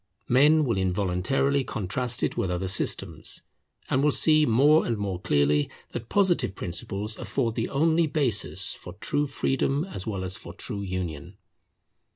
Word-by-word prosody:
Men 150 +5 +5
will 115 -6 0
involuntarily 95 +9 +1
contrast 115 +3 -2
it - - 0
with 95 - -1
other 90 +1 -2
systems, 95 0 -1 0.4
and 130 - +1
will 150 - +4
see 155 +1 +5
more 145 +7 +5
and 115 - -2
more 95 -3 -3
clearly 75 -1 +2 0.2
that 115 -1 -6
Positive 185 - +1
principles 100 +4 -3
afford 120 -5 -1
the 115 0 -2
only 160 +3 +2
basis 120 - 0
for 90 - -10
true 145 +9 -1
freedom 135 +2 0
as 105 - -6
well 100 -4 -3
as 95 0 -2
for - - -11
true 100 - -5
union. 90 -2 -5
110 Hz, 155 wpm, -26 LUFS, 95-140 Hz, 0.4 s, Men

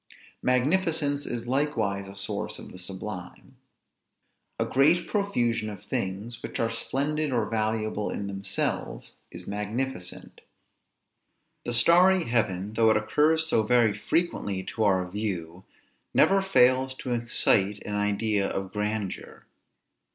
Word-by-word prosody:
Magnificence 145 +2 +1
is 120 -1 -4
likewise 115 -7 -1
a 100 - -10
source 100 0 -3
of - - -10
the 90 - -10
sublime. 95 0 -7 1.0
A - - 0
great 165 +6 +3
profusion 120 - 0
of 100 -3 -9
things, 100 +5 -4
which - - -6
are 115 0 +1
splendid 145 +6 -1
or 120 - +1
valuable 110 -1 -1
in 100 - -4
themselves, 100 -1 -3 0.2
is - - -9
magnificent. 105 -1 -4 1.2
The 120 - -2
starry 175 +9 +5
heaven, 105 - -1
though 110 0 +4
it 110 - +4
occurs 160 +2 +2
so 160 -8 +2
very 110 -1 +3
frequently 105 - -1
to 110 +2 -3
our 95 -2 +2
view 90 -3 -4 0.5
never 195 0 +5
fails 130 -7 +3
to 130 - -6
excite 110 -4 +2
an 105 - -4
idea 105 0 0
of 95 -1 -4
grandeur. 105 -2 -4
110 Hz, 125 wpm, -27 LUFS, 100-135 Hz, 1.2 s, starry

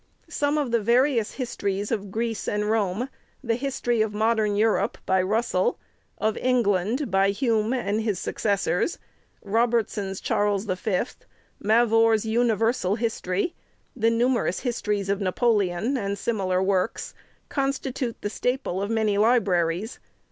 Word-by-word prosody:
Some 290 +1 0
of 285 -5 -1
the 235 - +3
various 235 0 +2
histories 205 -6 -3
of 205 -3 -2
Greece 225 +2 -3
and 210 0 0
Rome; 215 +2 0 0.4
the 235 -3 +1
History 245 -2 -1
of 215 -1 -1
Modern 215 -1 +2
Eu 220 +2 +4
rope, 200 -1 0
by 190 0 +3
Russell; 230 - 0 0.4
of 220 0 0
England, 235 0 +1
by 195 +1 +3
Hume 220 +1 +1
and 220 -4 0
his 215 -4 -1
successors; 200 - -1 0.5
Robertson's 215 -3 0
Charles 205 -2 0
V.; 185 -1 0 0.6
Mavor's 225 0 +3
Universal 225 -3 +1
History; 225 - -1 0.4
the 225 -2 +2
numerous 235 -4 +1
Histories 210 -5 -1
of 200 +1 0
Napo 200 +6 +2
leon, 205 +4 0
and 200 -3 -2
similar 190 -5 0
works, 190 +2 -1 0.4
constitute 270 -3 -2
the 205 - -2
staple 250 -8 -1
of 200 - -2
many 215 -3 +1
libraries. 200 -3 +1
220 Hz, 135 wpm, -25 LUFS, 200-235 Hz, 0.6 s, Eu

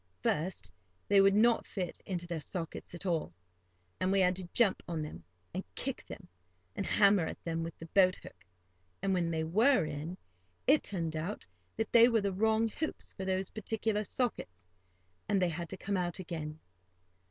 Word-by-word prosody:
First 150 - 0 0.4
they 200 -1 +6
would 195 0 +5
not 230 +2 +4
fit 180 -4 -4
into 175 -3 -2
their 170 -2 -3
sockets 165 +2 -6
at 175 - -7
all, 165 - 0 0.7
and 185 +1 +1
we 195 - +4
had 180 0 +4
to 180 -2 -6
jump 225 -6 +3
on 165 -3 -2
them, 150 - -8 0.3
and - - -3
kick - - -3
them, - - -9 0.5
and - - -2
hammer 200 -5 +5
at - - -7
them 165 -1 -2
with 165 0 -5
the 165 - -8
boat 185 +2 +4
hook; - - -14 0.6
and, 195 -1 +2
when 175 -2 +1
they 160 -1 0
were 220 - +4
in, 155 +4 -5 0.5
it 290 +3 +6
turned 165 -5 -3
out 165 +7 -4 0.3
that 225 - -1
they 235 0 +8
were 230 -3 +3
the 200 -1 -1
wrong 220 +3 +3
hoops 310 +8 -4
for 190 - -5
those 190 0 -1
particular 220 0 -1
sockets, 95 - -2 0.6
and 200 - +3
they 180 -2 +2
had 170 0 -4
to 190 - -6
come 200 +1 -1
out 175 -2 -1
again. 160 -4 -5
185 Hz, 185 wpm, -32 LUFS, 165-205 Hz, 0.7 s, they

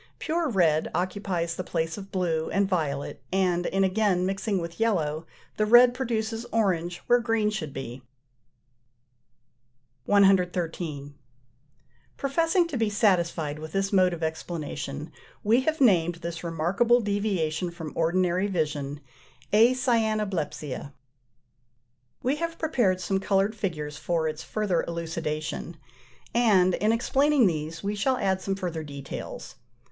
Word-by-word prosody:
Pure 325 0 -1
red 165 -8 +2
occupies 180 -2 -2
the 185 - -4
place 165 -2 -2
of 195 -1 -9
blue 165 -4 -1
and 200 0 +1
violet, 145 -8 -2
and 180 -2 +1
in 195 +1 +1
again 190 -1 +2
mixing 195 +2 -1
with 170 +2 -6
yellow 165 -8 0 0.3
the 215 - +2
red 240 +2 +7
produces 225 -3 -2
orange 180 -6 0
where 245 0 +4
green 225 -3 +1
should 170 -9 -4
be. 135 -2 -7 2.0
113. 180 -7 +2 1.0
Professing 330 +5 +2
to 295 -6 -4
be 225 -2 +1
satisfied 170 -7 +1
with 155 0 -8
this 195 +1 0
mode 185 -2 +5
of 170 -2 -5
explanation, 160 -2 -4 0.3
we 230 +5 +4
have 315 +3 -1
named 175 -9 +4
this 170 0 -6
remarkable 175 +9 +2
deviation 195 -6 -1
from 165 -3 -7
ordinary 180 +3 +1
vision 150 -5 -2 0.5
"Acyanoblepsia." 215 - +1 1.3
We 265 +4 +1
have 335 +1 -3
prepared 240 - +1
some 190 +2 -1
coloured 195 +2 +1
figures 155 -8 -4
for 165 -1 -1
its 155 0 -4
further 205 -4 -1
elucidation, 165 -2 -4 0.6
and 200 -6 +4
in 210 +4 +2
explaining 270 +3 +3
these 160 -1 -2
we 200 +1 -1
shall 255 +6 +1
add 190 -3 0
some 195 0 -2
further 175 -4 -4
details. 140 -2 -8
185 Hz, 125 wpm, -26 LUFS, 165-215 Hz, 2.0 s, red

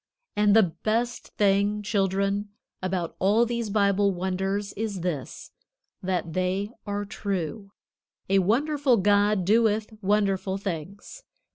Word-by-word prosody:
And 210 0 +4
the 225 - +7
best 225 +7 -2
thing, 205 +1 +2
children, 200 0 0 0.3
about 185 -2 -2
all 210 +5 +4
these 235 -2 -2
Bible 200 -1 +3
wonders, 190 +2 -2
is 205 -3 -3
this, 165 -7 -4 0.5
that 180 -3 -2
they 185 +3 -1 0.2
are 205 0 -2
true. 200 0 -4 0.6
A 195 +1 +4
wonderful 265 - +2
God 205 -1 +3
doeth 220 +1 +2
wonderful 195 -1 +1
things. 195 - -6
200 Hz, 115 wpm, -26 LUFS, 190-210 Hz, 0.6 s, the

